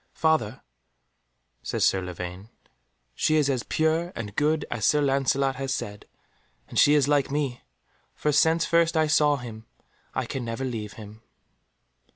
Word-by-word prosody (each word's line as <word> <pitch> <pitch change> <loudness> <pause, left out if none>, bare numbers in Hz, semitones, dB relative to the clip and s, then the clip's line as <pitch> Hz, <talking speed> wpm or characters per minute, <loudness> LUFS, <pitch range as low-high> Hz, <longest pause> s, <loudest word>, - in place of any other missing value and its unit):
"Father," 135 -8 0 1.0
said - - -2
Sir 95 - +3
Lavaine, 90 +3 -7 0.6
"she 155 - +1
is 145 -2 +3
as 130 -3 -1
pure 160 +5 0
and 105 -3 -6
good 155 +1 +1
as - - -3
Sir 150 - +4
Lancelot 135 -1 +1
has 135 0 -3
said, 105 -6 -5 0.6
and - - -1
she 145 - +6
is 145 -2 +3
like 145 -2 +2
me, 140 -3 -2 0.5
for 150 - 0
since 160 +3 +3
first 170 +1 +2
I 155 - +4
saw 150 -1 +3
him 115 -4 -9 0.5
I - - -1
can 130 - -4
never 115 +3 -4
leave 110 -5 -5
him." 110 -1 -12
135 Hz, 155 wpm, -26 LUFS, 115-150 Hz, 1.0 s, she